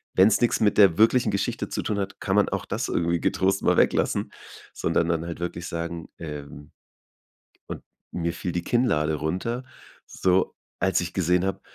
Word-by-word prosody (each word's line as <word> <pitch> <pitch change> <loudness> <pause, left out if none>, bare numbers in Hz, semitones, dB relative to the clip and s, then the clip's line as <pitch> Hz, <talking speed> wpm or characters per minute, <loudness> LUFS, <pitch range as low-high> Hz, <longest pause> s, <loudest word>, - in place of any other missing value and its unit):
wenn's 100 +3 +5
nix 120 - +2
mit 105 -2 +3
der 95 -6 +6
wirklichen 115 +1 +4
Geschichte 100 0 -2
zu - - -3
tun 105 -1 -1
hat, 95 0 -4
kann - - -1
man - - +3
auch - - -3
das - - -3
irgendwie 85 0 0
getrost 95 +1 +1
mal - - +3
weglassen. - - +1 0.4
Sondern 85 - 0
dann 85 -1 0
halt 85 -1 -6
wirklich 85 0 -4
sagen: 85 -1 -5
„Ähm, 75 -1 -8 1.0
und - - -7 0.3
mir 85 -1 -2
fiel 85 +1 -4
die 85 0 -2
Kinnlade 80 -11 +1
runter, 95 - -3 0.4
so 95 0 +1 0.3
als 95 +2 +2
ich 85 0 -5
gesehen 90 0 +2
habe, 95 - -2
90 Hz, 175 wpm, -25 LUFS, 85-100 Hz, 1.0 s, der